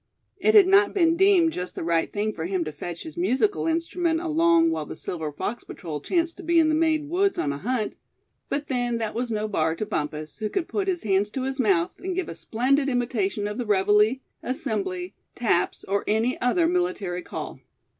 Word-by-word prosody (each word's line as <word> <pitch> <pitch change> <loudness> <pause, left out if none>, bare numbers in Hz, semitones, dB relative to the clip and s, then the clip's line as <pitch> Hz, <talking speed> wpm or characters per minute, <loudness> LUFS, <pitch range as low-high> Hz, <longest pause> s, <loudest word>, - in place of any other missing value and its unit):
It 430 +4 +3
had 410 -3 +9
not 395 +2 +4
been 335 -3 +4
deemed 370 -3 +4
just 180 0 -5
the - - -4
right 165 0 +1
thing 215 +1 -1
for 160 - -5
him 185 -2 0
to 155 - -5
fetch 170 +3 -7
his 320 +1 -9
musical 355 - +1
instrument 330 0 0
along 330 0 +3
while 325 - -3
the - - -7
Silver 160 -4 -4
Fox 210 +10 -4
Patrol 155 -5 -7
chanced 335 - 0
to 380 - -9
be 340 0 +2
in 320 -1 +5
the - - +2
Maine 310 -2 +1
woods 390 +5 +1
on 140 -2 0
a 140 - -6
hunt; 230 - -1 0.6
but 285 +1 -2
then 245 -3 0
that 225 -2 -3
was 240 0 -2
no 215 0 -1
bar 160 -6 0
to 215 - -3
Bumpus, 155 -5 -4
who 215 -1 -2
could 355 - -2
put 395 -2 -2
his 360 -2 -1
hands 200 0 +2
to 260 +4 -4
his 265 +1 -3
mouth, 190 -8 +1
and 370 -1 -4
give 375 -2 -2
a - - -5
splendid 270 +5 +1
imitation 225 -5 -1
of 210 +3 -5
the 245 - -2
reveille, 210 +3 +4 0.3
assembly, 195 -8 -3 0.2
taps, 210 -7 0
or 200 +1 -1
any 225 +4 +1
other 330 +7 +3
military 345 - -1
call. - - -7
245 Hz, 210 wpm, -25 LUFS, 195-330 Hz, 0.6 s, had